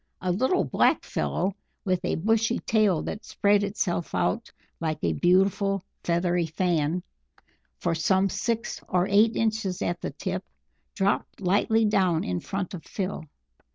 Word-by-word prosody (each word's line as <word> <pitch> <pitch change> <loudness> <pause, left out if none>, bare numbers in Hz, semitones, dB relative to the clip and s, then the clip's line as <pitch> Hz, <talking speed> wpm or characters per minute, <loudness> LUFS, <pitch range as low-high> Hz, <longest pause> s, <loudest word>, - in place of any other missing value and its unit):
A 185 - -1
little 260 - +2
black - - +2
fellow, 190 +2 -1 0.3
with 185 -2 0
a - - 0
bushy 225 +5 +1
tail 210 -7 +2
that 210 - -5
spread 205 0 +2
itself 195 -4 -2
out 230 +1 0 0.3
like 155 -2 -1
a - - +2
beautiful 195 +2 +2 0.2
feathery 175 0 +1
fan 170 0 0 0.7
for 170 - 0
some 190 +4 +2
six 225 +4 -2
or 180 0 +2
eight 215 +3 +4
inches 215 -5 0
at 175 +1 -2
the - - -2
tip, - - -4 0.5
dropped 195 0 0
lightly 205 +4 +2
down 190 -6 +2
in 90 0 -2
front 195 - -4
of 175 - -7
Phil. 190 -5 -4
190 Hz, 145 wpm, -26 LUFS, 175-210 Hz, 0.7 s, eight